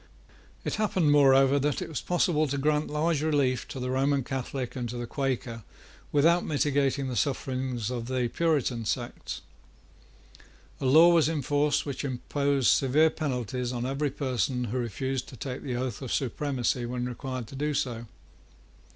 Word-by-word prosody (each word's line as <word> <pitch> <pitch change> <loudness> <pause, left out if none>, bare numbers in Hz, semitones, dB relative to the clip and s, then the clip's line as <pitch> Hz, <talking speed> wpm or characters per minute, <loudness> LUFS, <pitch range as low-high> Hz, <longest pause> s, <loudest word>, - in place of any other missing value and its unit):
It - - -1
happened, 185 -7 +2
moreover, 135 -1 +5
that 145 +1 0
it - - -4
was 155 - -4
possible 170 -3 +1
to 140 +1 -2
grant 150 +2 +1
large 150 0 0
relief 140 -5 +1
to 135 - -7
the 125 0 -2
Roman 135 +1 +1
Catholic 130 0 -4
and 120 -2 -3
to 120 - -5
the 120 - -3
Quaker 125 -3 -3 0.5
without 165 +4 +4
mitigating 140 -2 +1
the 125 - -3
sufferings 130 -4 -1
of 120 -2 -4
the 130 -1 0
Puritan 140 -8 0
sects. 105 - -4 1.4
A - - -3
law 165 +6 +7
was 165 -2 +4
in 155 -4 -2
force 145 +2 +1
which 140 -3 -4
imposed 140 +1 0
severe 150 +4 +4
penalties 125 -4 -3
on 120 -1 -3
every 140 +3 -1
person 125 - -1
who 120 +2 -2
refused 130 +3 -3
to 130 - -11
take 125 +3 -5
the 130 -3 -3
oath 125 -2 -3
of 130 - -5
supremacy 130 -2 -1
when 125 0 -3
required 130 0 -5
to - - -9
do 150 +2 -1
so. 120 -4 -2
135 Hz, 165 wpm, -28 LUFS, 125-145 Hz, 1.4 s, law